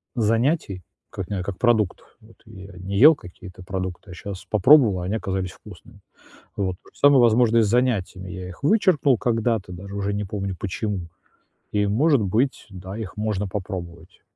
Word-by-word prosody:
занятий 115 - 0 0.3
как 95 -2 -7
не 100 -3 -2
как 95 0 -5
продуктов. 110 -6 0
Вот 110 +1 -20
я 100 -3 -12
не 95 +2 -4
ел 150 +8 +8
какие-то 90 -3 -12
продукты, 95 0 -5
а - - -8
щас 95 +2 -8
попробовал, 110 -2 +5
а - - -4
они 100 +4 -1
оказались 95 -4 -3
вкусными. 95 -7 -15 0.5
Вот. 95 -2 -2
То - - -19
же - - -21
самое, 145 -2 +6
возможно, 115 0 +4
и - - +6
с 110 - +2
занятиями. 105 -6 0
Я 90 +1 -7
их 90 +8 -12
вычеркнул 150 - +3
когда-то, 115 -4 -1
даже 100 +3 -9
уже 100 0 -2
не 105 +1 -2
помню 100 -1 -4
почему. 100 -2 -4 0.6
И, 105 -1 +1
может 135 +6 +3
быть, 110 +7 0
да, 95 +1 -8
их 110 -5 -7
можно 105 -2 -2
попробовать 90 -3 -7
100 Hz, 175 wpm, -23 LUFS, 95-115 Hz, 0.6 s, ел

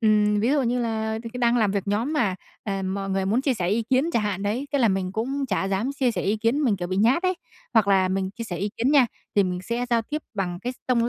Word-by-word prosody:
ừm, 210 -2 +3
ví 230 +4 +2
dụ 285 -1 +3
như 245 +1 0
là 220 -1 -1
thì 230 - -7
cứ 250 - -6
đang 240 0 +3
làm 215 -4 +3
việc 200 -1 -1
nhóm 225 +9 0
mà, 225 -11 +1 0.3
ờ, 195 -2 -2
mọi 195 +1 -3
người 190 0 0
muốn 220 +6 +2
chia 270 -1 +1
sẻ 180 -6 -1
ý 215 +4 +1
kiến 260 +8 +1
chả 235 - +2
hạn 205 -2 -2
đấy, 220 +7 -1
thế 285 - +2
là 235 - +4
mình 190 -1 -1
cũng 270 +6 -2
chả 195 -3 0
dám 200 +8 -1
chia 265 -3 +1
sẻ - - -3
ý 205 +3 +1
kiến, 230 +7 +1
mình, 215 -6 +2
kiểu, 175 -1 -4
bị 185 - -2
nhát 235 - +3
ấy. 370 0 +2 0.4
Hoặc 220 -3 +4
là 190 -2 +4
mình 190 0 -1
chia 230 +3 -7
sẻ 180 -5 -5
ý 200 +4 -2
kiến 245 +4 +1
nha, 275 -4 +6 0.3
thì 205 - +5
mình 180 -1 -2
sẽ 235 +5 -2
giao 230 -1 +3
tiếp 300 +7 -4
bằng 180 -3 -2
cái 250 +1 -2
s - - -19
tông 240 -2 +2
220 Hz, 300 wpm, -24 LUFS, 195-245 Hz, 0.4 s, nha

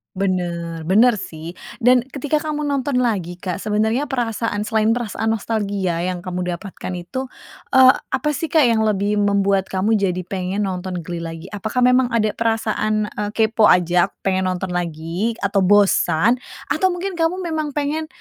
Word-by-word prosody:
Bener. 170 -4 -2
Bener 215 +4 +4
sih 160 -2 -7 0.3
dan 250 +1 +6
ketika 290 +3 -1
kamu 300 -1 -3
nonton 275 -3 0
lagi 185 -7 -1
Kak 180 0 -4
sebenarnya 220 +6 0
perasaan, 230 -4 -2
selain 220 0 +1
perasaan 225 -2 -3
nostalgia 200 -5 -2
yang 180 0 -3
kamu 180 -1 -3
dapatkan 185 0 -7
itu, 220 +10 -5 0.5
eee, 260 0 +9
apa 265 +3 -2
sih 310 +3 -3
Kak 315 -1 +4
yang 230 -3 +3
lebih 205 0 +1
membuat 200 -1 +2
kamu 190 +3 0
jadi 185 -2 -1
pengen 185 +2 -3
nonton 185 -2 -4
Glee 175 0 -5
lagi? 165 +2 -7
Apakah 220 +4 -1
memang 250 0 +4
ada 215 -2 +2
perasaan, 215 -2 -1
eee, 205 0 -3
kepo 220 -1 +3
aja 175 0 +4 0.2
pengen 190 -1 +1
nonton 185 0 -2
lagi 175 +5 -2
atau 200 0 +2
bosan? 200 +2 +3 0.3
Atau 375 -2 +2
mungkin 360 0 -4
kamu 345 +3 0
memang 310 -3 -3
pengen 300 +2 -1
205 Hz, 160 wpm, -20 LUFS, 180-245 Hz, 0.5 s, eee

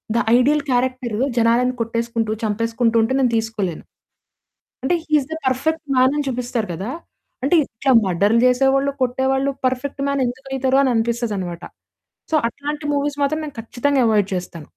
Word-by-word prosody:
The - - +3 0.2
ideal 290 +3 +2
character 250 -3 0 0.2
జనాలను 235 +2 +3
కొట్టేసుకుంటూ, 230 -1 -2
చంపేసుకుంటూ 230 +2 0
ఉంటే 235 +4 0
నేను 250 -3 +2
తీసుకోలేను. 215 -7 -3 1.0
అంటే 305 +7 +1
he 310 - -15
is 265 - -8
the - - 0
perfect 305 +5 0
man 255 +1 +4
అని 295 - -1
చూపిస్తారు 245 -4 -2
గదా! 195 +8 -5 0.5
అంటే 285 +6 +2
ఇట్లా 260 +4 -1
మర్డర్లు 200 +5 +2
చేసేవాళ్ళు, 270 +2 +3
కొట్టేవాళ్ళు 265 +2 +1 0.2
పర్ఫెక్ట్ 260 +2 -2
మ్యాన్ 280 -1 0
ఎందుకైతరు? 265 +1 -1
అననిపిస్తదన్నమాట. 225 -8 -1 0.7
సో - - +4
అట్లాంటి 295 +4 -6
మూవీస్ 285 0 -1
మాత్రం 310 +3 0
నేను 290 -5 -8
ఖచ్చితంగా 260 +4 0
అవాయిడ్ 205 -3 +2
చేస్తాను. 170 -4 -6
250 Hz, 140 wpm, -20 LUFS, 225-270 Hz, 1.0 s, మ్యాన్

